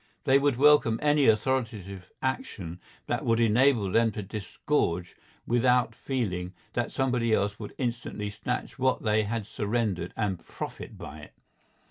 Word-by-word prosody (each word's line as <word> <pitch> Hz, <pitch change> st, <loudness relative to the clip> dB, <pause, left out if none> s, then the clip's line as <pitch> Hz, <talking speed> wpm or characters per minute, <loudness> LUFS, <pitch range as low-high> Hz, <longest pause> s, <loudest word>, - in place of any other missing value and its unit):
They 135 Hz, +1 st, +5 dB
would 140 Hz, -2 st, +2 dB
welcome 140 Hz, -4 st, +5 dB
any 150 Hz, -1 st, +3 dB
authoritative 110 Hz, -5 st, 0 dB
action 95 Hz, -9 st, -3 dB, 0.3 s
that -, -, -1 dB
would 115 Hz, 0 st, +2 dB
enable 115 Hz, -2 st, +3 dB
them 115 Hz, +2 st, +4 dB
to 105 Hz, -, -4 dB
disgorge 95 Hz, -, -2 dB, 0.3 s
without 120 Hz, -1 st, +3 dB
feeling 95 Hz, -9 st, -3 dB, 0.2 s
that 120 Hz, -1 st, -1 dB
somebody 125 Hz, -4 st, +1 dB
else 100 Hz, 0 st, +1 dB
would 105 Hz, -, -8 dB
instantly 115 Hz, -4 st, -3 dB
snatch 115 Hz, +6 st, -4 dB
what 130 Hz, 0 st, +1 dB
they 110 Hz, -1 st, +2 dB
had 110 Hz, 0 st, -2 dB
surrendered 105 Hz, -5 st, -1 dB
and 100 Hz, -5 st, -1 dB
profit -, -, -7 dB
by -, -, -8 dB
it. -, -, -13 dB
115 Hz, 140 wpm, -28 LUFS, 100-125 Hz, 0.3 s, They